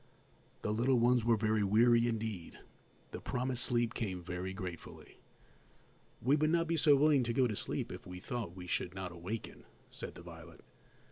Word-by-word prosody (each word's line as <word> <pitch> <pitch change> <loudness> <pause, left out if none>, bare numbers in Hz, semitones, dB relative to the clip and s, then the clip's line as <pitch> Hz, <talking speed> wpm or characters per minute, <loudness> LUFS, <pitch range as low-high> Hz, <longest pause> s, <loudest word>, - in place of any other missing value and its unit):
The 105 - 0
little 125 +4 +3
ones 120 0 +4
were 115 -1 +3
very 110 0 +1
weary 115 +4 +4
indeed. 110 -6 -4 0.5
The - - -6
promised 125 0 -1
sleep 120 -1 +1
came 95 -5 -3
very 90 +2 -4
gratefully. 90 -4 -8 1.0
"We 135 +5 +4
would 155 +1 +2
not 165 +1 +2
be 165 0 0
so 150 -2 +5
willing 145 -1 +4
to 120 -1 -1
go 130 +2 +3
to 110 -4 -1
sleep - - -3
if - - -9
we 90 0 -7
thought 110 -3 -5
we 90 -1 -8
should 90 +1 -2
not 95 -2 -5
awaken," 90 +6 -6 0.3
said - - -7
the 85 - -11
violet. 85 -1 -12
110 Hz, 180 wpm, -34 LUFS, 90-125 Hz, 1.0 s, so